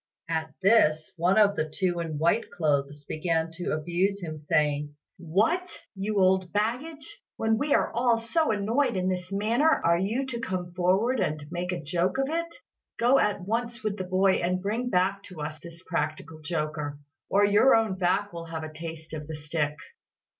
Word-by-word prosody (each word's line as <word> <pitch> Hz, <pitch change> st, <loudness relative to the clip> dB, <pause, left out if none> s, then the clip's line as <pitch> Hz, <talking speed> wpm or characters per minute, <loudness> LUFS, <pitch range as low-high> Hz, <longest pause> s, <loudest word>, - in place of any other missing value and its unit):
At 160 Hz, -1 st, -3 dB
this, 155 Hz, -7 st, +4 dB
one 180 Hz, +4 st, +2 dB
of 205 Hz, -2 st, +5 dB
the 155 Hz, -3 st, -1 dB
two 175 Hz, +1 st, -1 dB
in 160 Hz, -3 st, -3 dB
white 170 Hz, +9 st, +1 dB
clothes 145 Hz, -2 st, -1 dB
began 160 Hz, +2 st, -1 dB
to 180 Hz, -, -3 dB
abuse 175 Hz, +6 st, 0 dB
him 160 Hz, -2 st, -4 dB
saying, 150 Hz, -1 st, 0 dB, 0.2 s
"What! 220 Hz, -, +1 dB, 0.3 s
you 200 Hz, +1 st, -1 dB
old 185 Hz, -1 st, +3 dB
baggage, 260 Hz, +8 st, -3 dB, 0.2 s
when 220 Hz, 0 st, +1 dB
we 290 Hz, 0 st, +2 dB
are -, -, +1 dB
all 235 Hz, 0 st, +3 dB
so 265 Hz, +8 st, 0 dB
annoyed 220 Hz, +3 st, +1 dB
in 185 Hz, 0 st, 0 dB
this 180 Hz, 0 st, -3 dB
manner, 225 Hz, +10 st, +2 dB
are 170 Hz, -, +3 dB
you 225 Hz, +8 st, -1 dB
to 250 Hz, -3 st, -5 dB
come 185 Hz, -5 st, -3 dB
forward 190 Hz, +8 st, +2 dB
and 155 Hz, -5 st, -1 dB
make 180 Hz, +1 st, -2 dB
a 180 Hz, -, -2 dB
joke 175 Hz, -, 0 dB
of 270 Hz, +1 st, 0 dB
it? 335 Hz, +1 st, -1 dB, 0.5 s
Go 245 Hz, +4 st, +4 dB
at 205 Hz, -2 st, +1 dB
once 235 Hz, +5 st, -3 dB
with 215 Hz, -2 st, -1 dB
the 190 Hz, -, -4 dB
boy 185 Hz, +1 st, +3 dB
and 180 Hz, +1 st, 0 dB
bring 220 Hz, +6 st, -2 dB
back 190 Hz, 0 st, +1 dB
to 185 Hz, -5 st, -11 dB
us 150 Hz, +1 st, -5 dB
this 170 Hz, +2 st, -12 dB
practical 155 Hz, -2 st, -3 dB
joker, 150 Hz, -2 st, -3 dB, 0.3 s
or 205 Hz, +1 st, +4 dB
your 205 Hz, +6 st, +5 dB
own 225 Hz, -3 st, +2 dB
back 190 Hz, +2 st, 0 dB
will 170 Hz, -1 st, -6 dB
have 165 Hz, -1 st, -5 dB
a 155 Hz, 0 st, -7 dB
taste 160 Hz, 0 st, -8 dB
of 150 Hz, -1 st, -6 dB
the 160 Hz, -, -5 dB
stick." 150 Hz, 0 st, -2 dB
185 Hz, 185 wpm, -27 LUFS, 160-220 Hz, 0.5 s, of